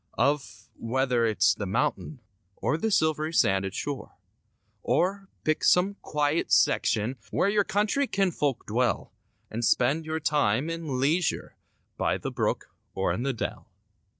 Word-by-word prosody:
Of, 140 Hz, 0 st, -1 dB
whether 125 Hz, 0 st, 0 dB
it's 110 Hz, -, +3 dB
the 105 Hz, -, -5 dB
mountains 125 Hz, +6 st, -2 dB, 0.3 s
Or -, -, 0 dB
the 195 Hz, +8 st, -1 dB
silv'ry 155 Hz, -6 st, +1 dB
sanded 95 Hz, -3 st, +2 dB
shore; 145 Hz, -2 st, -5 dB, 0.7 s
Or, 195 Hz, +3 st, 0 dB
pick 155 Hz, 0 st, 0 dB
some 185 Hz, +3 st, +4 dB
quiet 150 Hz, +1 st, 0 dB
section 115 Hz, +4 st, +2 dB
Where 195 Hz, -, +1 dB
your 205 Hz, 0 st, +3 dB
country 215 Hz, +8 st, 0 dB
kinfolk 165 Hz, -, 0 dB
dwell 120 Hz, +3 st, -1 dB, 0.4 s
And 115 Hz, +2 st, -3 dB
spend 140 Hz, +8 st, +2 dB
your 160 Hz, 0 st, -2 dB
time 145 Hz, -1 st, +1 dB
in 160 Hz, -6 st, -3 dB
leisure 155 Hz, +6 st, 0 dB, 0.4 s
By -, -, +1 dB
the -, -, -5 dB
brook -, -, -2 dB, 0.2 s
or 95 Hz, -, 0 dB
in -, -, -3 dB
the 135 Hz, +2 st, 0 dB
dell. 115 Hz, -, -5 dB
145 Hz, 140 wpm, -27 LUFS, 120-165 Hz, 0.7 s, some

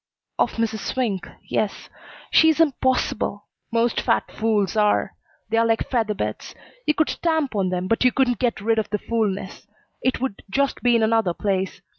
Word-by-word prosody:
"Of -, -, +2 dB
Mrs. 225 Hz, -1 st, -1 dB
Swink, 210 Hz, -10 st, -2 dB, 0.2 s
yes. 210 Hz, -2 st, -2 dB, 0.4 s
She's 320 Hz, 0 st, +5 dB
impossible. 260 Hz, -8 st, +1 dB, 0.3 s
Most 230 Hz, +1 st, +1 dB
fat -, -, 0 dB
fools 215 Hz, -2 st, 0 dB
are. 210 Hz, -1 st, +2 dB, 0.4 s
They're 225 Hz, +1 st, +3 dB
like 225 Hz, -1 st, 0 dB
feather 225 Hz, -4 st, +1 dB
beds. 105 Hz, -, -4 dB, 0.3 s
You 300 Hz, -, +3 dB
could 315 Hz, -, +2 dB
stamp 320 Hz, -5 st, 0 dB
on 190 Hz, -2 st, +1 dB
them, 180 Hz, 0 st, -2 dB
but 225 Hz, +5 st, +1 dB
you 250 Hz, -, +5 dB
couldn't 245 Hz, -5 st, +1 dB
get 235 Hz, -5 st, 0 dB
rid 225 Hz, +1 st, +2 dB
of 215 Hz, -, -3 dB
the 210 Hz, -, 0 dB
fool 225 Hz, 0 st, 0 dB
ness. 190 Hz, +1 st, -7 dB, 0.3 s
It 255 Hz, -, 0 dB
would 255 Hz, -6 st, -3 dB
just 280 Hz, +6 st, 0 dB
be 245 Hz, -1 st, +4 dB
in 230 Hz, -, +3 dB
another 220 Hz, -5 st, +2 dB
place. 190 Hz, -2 st, -2 dB
225 Hz, 175 wpm, -23 LUFS, 205-250 Hz, 0.4 s, She's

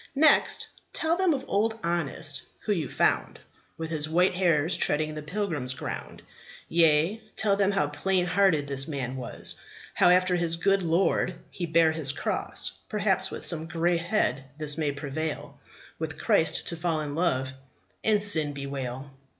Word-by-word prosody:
Next 310 Hz, +3 st, +4 dB, 0.3 s
tell 330 Hz, -2 st, +1 dB
them 370 Hz, -1 st, +2 dB
of 270 Hz, -3 st, -1 dB
Old 220 Hz, +2 st, +1 dB
Honest, 160 Hz, -4 st, -1 dB, 0.2 s
who 210 Hz, -, 0 dB
you 160 Hz, -7 st, -2 dB
found -, -, +1 dB, 0.4 s
With 160 Hz, 0 st, -5 dB
his 155 Hz, -1 st, -1 dB
white 180 Hz, +4 st, +3 dB
hairs 175 Hz, -2 st, +2 dB
treading 155 Hz, +1 st, 0 dB
the 155 Hz, -, -5 dB
pilgrim's 150 Hz, -6 st, -2 dB
ground; -, -, -6 dB, 0.4 s
Yea, 165 Hz, +5 st, +3 dB
tell 205 Hz, -2 st, +2 dB
them 200 Hz, -1 st, +2 dB
how 195 Hz, -6 st, +1 dB
plain 175 Hz, +5 st, 0 dB
hearted 180 Hz, -5 st, +3 dB
this 135 Hz, -1 st, +1 dB
man 135 Hz, -4 st, -3 dB
was, 125 Hz, -2 st, -3 dB, 0.3 s
How 175 Hz, -, +4 dB
after 180 Hz, 0 st, +4 dB
his 170 Hz, -1 st, 0 dB
good 195 Hz, +3 st, +2 dB
Lord 175 Hz, +1 st, +1 dB, 0.2 s
he 175 Hz, -3 st, -4 dB
bare 165 Hz, 0 st, +4 dB
his 155 Hz, -4 st, 0 dB
cross: -, -, -2 dB
Perhaps 195 Hz, -3 st, +1 dB
with -, -, -7 dB
some 160 Hz, -2 st, -3 dB
grey 170 Hz, +2 st, +1 dB
head 165 Hz, -, 0 dB
this 150 Hz, -1 st, -1 dB
may 155 Hz, -3 st, 0 dB
prevail, 145 Hz, +2 st, -5 dB, 0.4 s
With -, -, -4 dB
Christ -, -, +2 dB
to -, -, -3 dB
fall 165 Hz, -2 st, -1 dB
in 145 Hz, -1 st, -4 dB
love, 135 Hz, -6 st, 0 dB, 0.5 s
and 215 Hz, -1 st, +3 dB
sin 160 Hz, -8 st, +3 dB
bewail. 135 Hz, -1 st, -5 dB
165 Hz, 160 wpm, -27 LUFS, 150-190 Hz, 0.5 s, Next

